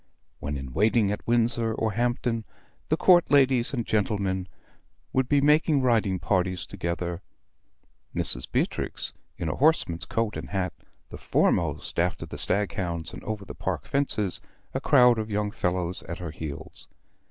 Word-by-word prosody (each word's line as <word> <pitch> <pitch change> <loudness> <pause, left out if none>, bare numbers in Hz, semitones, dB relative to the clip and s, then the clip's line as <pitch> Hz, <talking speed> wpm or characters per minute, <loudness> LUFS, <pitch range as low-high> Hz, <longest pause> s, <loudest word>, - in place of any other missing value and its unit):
When 70 0 -3
in 65 -2 -7
waiting 105 - +3
at 105 - -5
Windsor 115 -1 +2
or 110 -1 0
Hampton, 120 +1 0 0.5
the 155 - +2
Court 175 -1 +5
ladies 135 -4 +4
and 120 -5 -2
gentlemen 100 -3 0 0.7
would 130 -1 +1
be 145 -1 +4
making 150 -1 +4
riding 110 -6 +2
parties 90 -1 0
together; 85 +1 -3 0.9
Mrs. - - -1
Beatrix - - -1 0.2
in 85 - -3
a 75 - 0
horseman's 130 - +2
coat 115 -2 -1
and - - -7
hat, 95 -3 -1 0.4
the - - -9
foremost - - +1
after 90 +1 0
the - - -6
stag 100 +1 0
hounds 85 -3 -3
and - - -9
over 105 -2 -4
the - - -8
park - - -3
fences, 115 -9 0 0.3
a - - -2
crowd 125 -2 +5
of 110 0 -3
young 105 0 -1
fellows 90 -1 -1
at 85 - -4
her 85 -3 -6
heels. 75 -2 -8
105 Hz, 155 wpm, -26 LUFS, 90-120 Hz, 0.9 s, Court